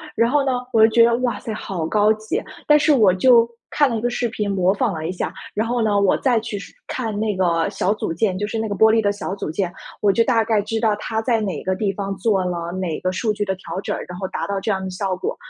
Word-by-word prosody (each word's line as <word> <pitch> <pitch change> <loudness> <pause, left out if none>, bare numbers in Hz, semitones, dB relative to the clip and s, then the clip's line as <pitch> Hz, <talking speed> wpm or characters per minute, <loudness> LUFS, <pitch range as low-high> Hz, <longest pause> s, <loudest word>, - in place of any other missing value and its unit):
然 230 +1 +3
后 285 0 +2
呢， 265 - +1 0.2
我 220 -1 +7
就 - - +5
觉 230 -1 +7
得： 235 0 +4
“哇 240 - -2
塞 225 - -6
好 175 -6 -4
高 210 +2 +3
级。” 220 - -3 0.3
但 300 - +7
是 300 0 +3
我 215 -8 +5
就 235 +4 +5 0.2
看 290 -2 +3
了 230 - -1
一 - - -4
个 240 +1 0
视 240 -1 -1
频 210 -2 -2
模 185 -1 +2
仿 220 -1 0
了 160 0 -4
一 175 - -2
下。 185 - -4 0.2
然 220 +2 0
后 240 0 0
呢， 205 -2 +2
我 200 -2 +3
再 245 -4 +2
去 215 -1 -5
是 - - -11
看 220 -5 -3
那 215 -2 0
个 170 -3 +1
小 195 - 0
组 165 - -3
件， 185 +2 0
就 205 - -1
是 220 +2 -3
那 220 -1 -2
个 205 - -2
玻 220 +3 +5
璃 225 - +3
的 205 -1 +2
小 205 -2 -5
组 195 - -5
件， 175 +1 -2 0.3
我 205 -1 +4
就 230 +3 +3
大 230 -3 +3
概 215 -2 +1
知 225 +2 -3
道 220 -2 +2
他 220 +1 -3
在 225 -1 +1
哪 195 -3 -3
个 190 0 0
地 195 0 0
方 195 0 -4
做 195 -2 +1
了 170 -1 -3
哪 185 -4 -3
个 185 - -1
数 215 +3 -1
据 210 0 -2
的 190 -1 -2
调 185 0 -6
整， - - -3
然 180 - -8
后 190 - -3
达 - - -4
到 200 -1 -2
这 - - -3
样 190 -1 -2
的 190 - -4
效 185 0 -2
果。 185 - -3
210 Hz, 310 characters per minute, -21 LUFS, 190-225 Hz, 0.3 s, 我